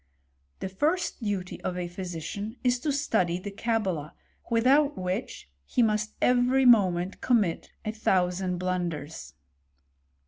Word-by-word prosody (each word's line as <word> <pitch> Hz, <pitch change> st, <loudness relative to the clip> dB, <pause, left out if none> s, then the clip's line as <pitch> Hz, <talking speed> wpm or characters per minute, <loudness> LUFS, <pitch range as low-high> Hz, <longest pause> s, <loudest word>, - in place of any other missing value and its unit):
13ie 190 Hz, -, -4 dB
first 315 Hz, -, 0 dB
duty 195 Hz, -4 st, -3 dB
of 180 Hz, -, -3 dB
a 180 Hz, -1 st, -2 dB
phpician 185 Hz, +5 st, -6 dB
is 250 Hz, -1 st, +2 dB
to 295 Hz, +4 st, -1 dB
study 220 Hz, -12 st, +1 dB
the 200 Hz, +3 st, -6 dB
Cabala, 195 Hz, -8 st, -2 dB, 0.4 s
without 270 Hz, +6 st, +3 dB
which 185 Hz, -, -4 dB, 0.2 s
he 240 Hz, -, +1 dB
must 215 Hz, -1 st, 0 dB
every 250 Hz, +2 st, +4 dB
moment 190 Hz, -6 st, +4 dB
commit 210 Hz, -9 st, +1 dB, 0.2 s
a 215 Hz, -, -1 dB
thou 190 Hz, -4 st, +2 dB
sand 180 Hz, 0 st, -2 dB
blunders. 175 Hz, -, -3 dB
200 Hz, 130 wpm, -27 LUFS, 180-245 Hz, 0.4 s, every